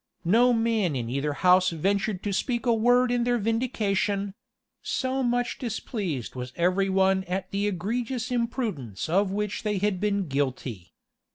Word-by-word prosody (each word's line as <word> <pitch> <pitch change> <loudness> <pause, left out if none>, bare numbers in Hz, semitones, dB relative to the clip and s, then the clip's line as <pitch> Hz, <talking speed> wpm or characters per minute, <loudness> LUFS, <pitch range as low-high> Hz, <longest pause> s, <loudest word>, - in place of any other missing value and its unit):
No 235 +8 +5
man 225 - +1
in 120 -2 -3
either 140 +3 -1
house 185 0 +6
ventured 195 +3 -1
to 205 - -1
speak 240 +5 -1
a 240 - +4
word 245 +2 +3
in 245 -1 +1
their 245 0 +2
vindication; 205 -3 0 0.5
so 260 0 -1
much 245 -1 0
displeased 200 - -3
was 125 -1 -6
every 185 +3 +2
one 190 0 +3
at 185 +1 -3
the 200 +1 0
egregious 230 +6 -2
imprudence 230 - -2
of 190 +4 +2
which 205 +1 -2
they 210 -2 -1
had 195 -1 0
been 200 -2 0
guilty. 130 - -3
200 Hz, 155 wpm, -26 LUFS, 180-235 Hz, 0.5 s, house